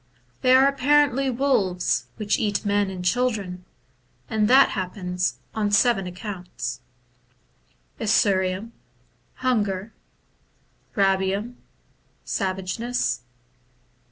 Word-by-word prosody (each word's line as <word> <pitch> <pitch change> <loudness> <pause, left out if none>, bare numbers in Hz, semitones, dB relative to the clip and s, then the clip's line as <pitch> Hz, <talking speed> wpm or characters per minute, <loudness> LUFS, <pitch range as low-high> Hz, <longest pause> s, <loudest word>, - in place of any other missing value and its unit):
They 255 -1 +5
are 265 +1 +6
apparently 275 -1 +3
wolves 235 -9 +1
which 210 -2 0
eat 210 -1 -1
men 205 -1 +1
and 180 -1 -6
children, 200 -4 -1 0.6
and 215 -1 +1
that 265 +4 +6
happens 180 -1 -2 0.2
on 210 -2 0
seven 205 -2 +3
accounts: 180 0 -6 0.6
— - - -40
1. 225 - -4
Esuriem 195 +1 +2 0.7
Hunger. 210 -4 0 1.0
2. 200 - +1
Rabicm 195 +4 +1 0.7
Savageness. 190 +6 -2
205 Hz, 95 wpm, -24 LUFS, 190-245 Hz, 1.0 s, are